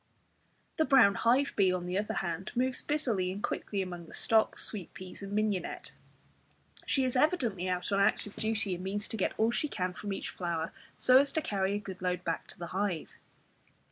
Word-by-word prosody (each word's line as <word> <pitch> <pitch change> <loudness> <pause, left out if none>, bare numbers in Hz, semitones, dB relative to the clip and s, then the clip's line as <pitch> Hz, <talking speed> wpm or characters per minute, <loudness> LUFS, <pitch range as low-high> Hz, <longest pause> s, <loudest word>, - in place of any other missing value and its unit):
The 315 - +3
brown 250 -9 +6
hive 255 +7 +2
bee 190 -3 +4
on 180 -1 -2
the 180 +1 -3
other 210 - -2
hand, 175 +1 -3
moves 255 +1 +2
busily 235 -12 0
and 200 +2 -6
quickly 200 -2 -2
among 175 -2 -7
the - - -10
stocks, 220 -1 +3
sweet 200 -6 -6
peas, 185 +1 -9
and 200 0 -6
mignonette. 210 -2 -1 1.0
She 270 - +2
is 255 -1 0
evidently 245 - +1
out 180 +2 -1
on 200 - +2
active 200 +1 +1
duty, 220 -3 0
and 180 +1 -5
means 205 +2 -3
to - - -3
get 200 - -1
all 225 +1 +3
she 270 +5 0
can 185 -9 -2
from 205 +2 -5
each 195 - -3
flower, 170 -2 -2 0.3
so 255 +1 +6
as 280 0 +2
to 315 - +1
carry 195 -1 0
a - - -1
good 190 -2 -8
load 180 -1 -1
back 165 - -2
to - - -10
the 170 - -5
hive. 190 -4 -1
200 Hz, 205 wpm, -31 LUFS, 185-230 Hz, 1.0 s, brown